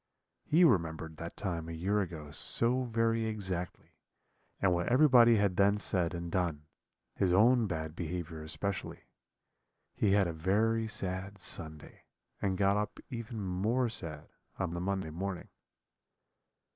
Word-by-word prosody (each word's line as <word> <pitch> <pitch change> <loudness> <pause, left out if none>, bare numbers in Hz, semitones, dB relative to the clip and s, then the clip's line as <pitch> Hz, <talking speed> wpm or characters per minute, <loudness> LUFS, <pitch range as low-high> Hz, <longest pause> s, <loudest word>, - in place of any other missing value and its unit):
He 165 +4 +4
remembered 80 - +1
that 85 +1 -7
time 85 -5 -3
a - - -5
year 100 +6 0
ago 80 -6 -6
so 125 +10 +2
very 115 -1 +1
exactly, 95 -5 -4 0.7
and 95 -2 +3
what 85 0 0
everybody 125 -3 +6
had 100 -4 +1
then 100 +1 +4
said 90 -4 -1
and 85 0 -5
done 85 -5 -1 0.5
his 95 -2 +1
own 115 +4 +5
bad 80 -3 -4
behaviour 85 -2 -5
especially. 80 +5 -4 0.9
He 100 -2 +2
had 100 -1 +4
a 85 - -2
very 110 +7 +1
sad 95 -1 -4
Sunday, 80 -5 -6 0.4
and 95 -2 0
got 100 +1 +3
up 105 +1 -3
even 115 -2 -5
more 110 +7 0
sad 80 -9 -6 0.3
on 90 -2 -2
the 85 - -3
Monday 95 -3 -2
morning. 95 +2 -5
95 Hz, 140 wpm, -32 LUFS, 85-110 Hz, 0.9 s, everybody